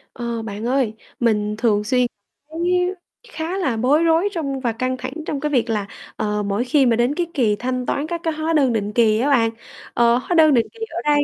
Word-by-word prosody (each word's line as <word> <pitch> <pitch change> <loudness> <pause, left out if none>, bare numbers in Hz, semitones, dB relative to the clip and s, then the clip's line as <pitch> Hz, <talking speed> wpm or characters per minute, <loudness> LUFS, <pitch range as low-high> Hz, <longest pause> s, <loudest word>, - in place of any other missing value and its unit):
Ờ, 235 -1 -3
bạn 215 0 -6
ơi, 255 -4 +1 0.3
mình 210 -3 +1
thường 215 -3 +2
xuyên 250 +2 +2 0.4
thấy 325 - -6 0.7
khá 330 +1 -3
là 270 -12 0
bối 275 +8 +3
rối 335 +4 +3
trong 280 -7 -3
và 245 -3 -1
căng 255 +3 -2
thẳng 255 0 -6
trong 290 -3 -3
cái 300 - -1
việc 245 -4 +1
là, 210 -3 -1 0.3
ờ, 210 -1 -1
mỗi 200 +4 -1
khi 270 +2 +3
mà 235 -2 +3
đến 240 +5 +1
cái 345 0 -1
kỳ 225 -7 +2
thanh 255 +2 -3
toán 285 +4 -1
các 340 0 -4
cái 325 - 0
hóa 315 +1 -1
đơn 275 -6 +3
định 210 -1 -2
kỳ 220 -2 +3
á 270 +5 +1
bạn. 235 -5 +4 0.4
Ờ, 235 0 +4
hóa 305 +8 -2
đơn 310 -3 +6
định 235 -3 +3
kỳ 455 - -17
ở - - -4
đây 295 -1 +3
255 Hz, 230 wpm, -21 LUFS, 225-300 Hz, 0.7 s, đơn